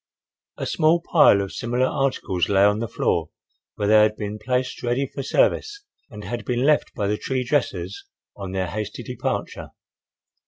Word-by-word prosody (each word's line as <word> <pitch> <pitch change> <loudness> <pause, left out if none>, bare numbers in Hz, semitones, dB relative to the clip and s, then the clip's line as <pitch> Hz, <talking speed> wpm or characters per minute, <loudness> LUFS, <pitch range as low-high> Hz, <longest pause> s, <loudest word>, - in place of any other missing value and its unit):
A - - -4
small 165 +1 +3
pile 160 - +5
of 100 0 -7
similar 120 +5 0
articles 130 -10 -1
lay 100 -1 +4
on 105 +1 +3
the 115 - -2
floor, 80 -6 -1 0.5
where 105 - -1
they 110 +1 +6
had 105 0 +3
been 105 0 -5
placed 125 +3 -2
ready 125 +3 0
for 135 - -6
service 410 - +1 0.3
and 105 -2 -10
had 120 +2 -5
been 125 0 -1
left 150 +1 +2
by 105 - -1
the 105 +1 0
tree 130 -1 -2
dressers 100 -9 -2 0.3
on 95 -2 -7
their 95 -1 -1
hasty 105 +4 -5
departure. 125 0 -4
115 Hz, 170 wpm, -23 LUFS, 100-130 Hz, 0.5 s, they